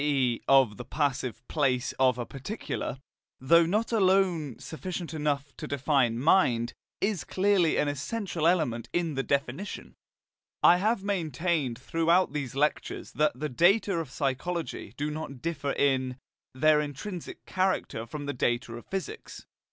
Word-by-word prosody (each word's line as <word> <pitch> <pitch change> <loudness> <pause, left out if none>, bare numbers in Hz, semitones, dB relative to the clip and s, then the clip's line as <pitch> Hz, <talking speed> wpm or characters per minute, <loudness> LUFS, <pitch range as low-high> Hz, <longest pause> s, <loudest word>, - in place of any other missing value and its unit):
e. 135 -5 +1
of 130 -7 +5
the - - -6
"passive" 130 -3 -2
place 135 -4 0
of 130 -2 +4
a 120 - -3
particular, 135 - -5 0.4
though 165 +5 +5
not 215 +6 0
alone 185 - +2
sufficient 165 +6 -6
to 145 -3 -2
define 135 -4 +1
mind, 120 -5 +3 0.3
is 200 -3 0
clearly 190 -4 +2
an 150 - +2
essential 165 +4 -2
element 150 -10 +1
in 170 -3 0
the 135 - 0
definition. 140 +7 -3 0.7
I 175 - +8
have 210 +2 +1
maintained 165 - -1
throughout 165 +7 +2
these 140 -4 -4
lectures 150 +2 -1
that 150 -4 +1
the 150 - -1
data 190 - +3
of 165 -5 -2
psychology 140 - -3
do 150 +1 -2
not 150 -4 -6
differ 145 -2 -2
in, 130 -2 +1 0.4
their 150 +2 +4
intrinsic 155 +5 -6
character 185 -11 -1
from 145 +1 -6
the 145 - -2
data 120 -1 -1
of 120 - -9
physics. 195 - -6
150 Hz, 140 wpm, -28 LUFS, 130-175 Hz, 0.7 s, I